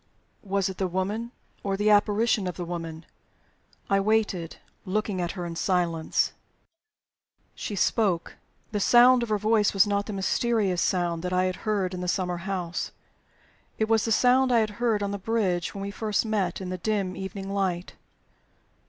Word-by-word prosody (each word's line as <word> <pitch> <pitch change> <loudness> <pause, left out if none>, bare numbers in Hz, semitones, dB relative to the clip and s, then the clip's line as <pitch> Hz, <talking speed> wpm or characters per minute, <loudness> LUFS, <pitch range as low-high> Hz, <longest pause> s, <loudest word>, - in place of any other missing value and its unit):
Was 195 -1 0
it 190 -1 -6
the 190 - +1
woman, 200 +6 -2 0.3
or 195 -1 -1
the 210 +1 +3
apparition 210 0 +3
of 180 - -5
the 175 - -4
woman? 165 -1 -6 0.8
I 195 - +3
waited, 195 -5 0 0.3
looking 200 -1 -1
at 175 -1 -2
her 180 -3 -5
in 170 -1 -5
silence. 170 -2 0 1.2
She 205 - -5
spoke. 190 -3 +1 0.3
The 205 - -1
sound 245 +4 +6
of 235 - -3
her 215 - +2
voice 215 0 +2
was 195 - +6
not 205 0 -1
the 215 - -4
mysterious 195 -1 +1
sound 175 -2 0
that 180 +1 -3
I 180 0 +3
had 185 0 -1
heard 195 -4 0
in 180 - -4
the 180 - -3
summer 180 -1 -1
house. 175 -1 -3 0.9
It 220 - +1
was 225 -1 +3
the 225 - -1
sound 255 +3 +4
I 235 -2 +5
had 215 -1 -1
heard 220 -4 +2
on 200 - -2
the 200 - -4
bridge 190 -5 -1
when 195 - -4
we 200 - -4
first 215 +1 -1
met 200 -5 -1
in 185 - -5
the 185 0 -4
dim 195 -1 -1
evening 195 0 -5
light. 185 -3 -1
195 Hz, 180 wpm, -26 LUFS, 180-215 Hz, 1.2 s, sound